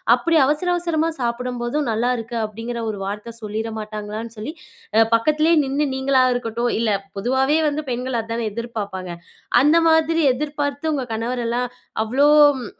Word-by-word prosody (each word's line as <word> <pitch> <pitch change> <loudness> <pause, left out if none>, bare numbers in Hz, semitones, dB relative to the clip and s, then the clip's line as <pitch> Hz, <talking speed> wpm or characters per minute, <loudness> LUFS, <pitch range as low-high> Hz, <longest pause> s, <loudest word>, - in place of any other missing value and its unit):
அப்படி 325 +6 +1
அவசர 300 +5 0
அவசரமா, 330 -2 0
சாப்படம்போதும், 245 +3 -2
"நல்லாயிருக்கு" 235 +1 -1
அப்படிங்கிற 230 +2 -5
ஒரு 205 - -7
வார்த்த 210 +3 -6
சொல்லிற 220 +1 -4
மாட்டாங்களான்னு 215 +2 -6
சொல்லி, 245 +9 -5 0.4
அ, - - +7 0.2
பக்கத்திலேயே 305 +7 +3
நின்னு 280 +2 0
நீங்களா 265 0 +3
இருக்கட்டும் 235 0 -1
இல்ல 230 -1 +1 0.3
பொதுவாவே 265 +7 +2
வந்து, 295 +1 -3
பெண்கள் 250 0 -2
அதானே 230 0 -3
எதிர்ப்பாப்பாங்க. 230 -3 -5 0.7
அந்த 295 +3 +4 0.2
மாதிரி 320 +1 +3
எதிர்பார்த்து, 290 +2 -2
உங்க 275 -3 -1
கணவரெல்லாம், 240 +1 -1 0.4
அவ்வளோ 255 +6 +2 0.4
ம் - - -6
245 Hz, 135 wpm, -21 LUFS, 230-290 Hz, 0.7 s, அ